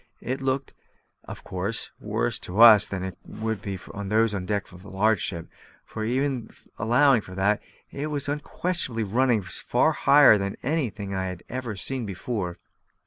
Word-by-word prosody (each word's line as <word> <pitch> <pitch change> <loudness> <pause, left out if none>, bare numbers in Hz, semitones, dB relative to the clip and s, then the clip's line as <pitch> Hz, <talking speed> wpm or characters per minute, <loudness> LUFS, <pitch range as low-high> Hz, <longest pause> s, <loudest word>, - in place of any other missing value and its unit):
It 130 +3 -3
looked, 135 +1 -1 0.5
of - - -9
course, 95 +5 -3
worse - - -2
to 90 +4 -5
us 110 -3 +9
than 95 -2 -4
it 95 -1 -6
would 110 -2 -4
to 100 -2 -4 0.3
those 110 +2 +2
on 100 - -2
the 90 - -8
deck 100 -3 -2
of 90 0 -14
a 100 - -11
large 105 +3 +2
ship; 85 -3 -4 0.5
but 110 - -4
even 130 0 -1 0.3
allowing 120 +3 +4
for 95 -2 -11
that, 100 +2 +1 0.3
it 145 +2 -4
was 145 -2 -3
unquestionably 150 -4 -2
running 115 +1 +2
far 120 - +1
higher 140 -8 +6
than 100 0 -3
anything 115 -9 -2
I 95 0 -2
had 90 -1 -7
ever 125 -3 -4
seen 125 +3 -3
before. 95 -2 -4
110 Hz, 170 wpm, -25 LUFS, 95-130 Hz, 0.5 s, us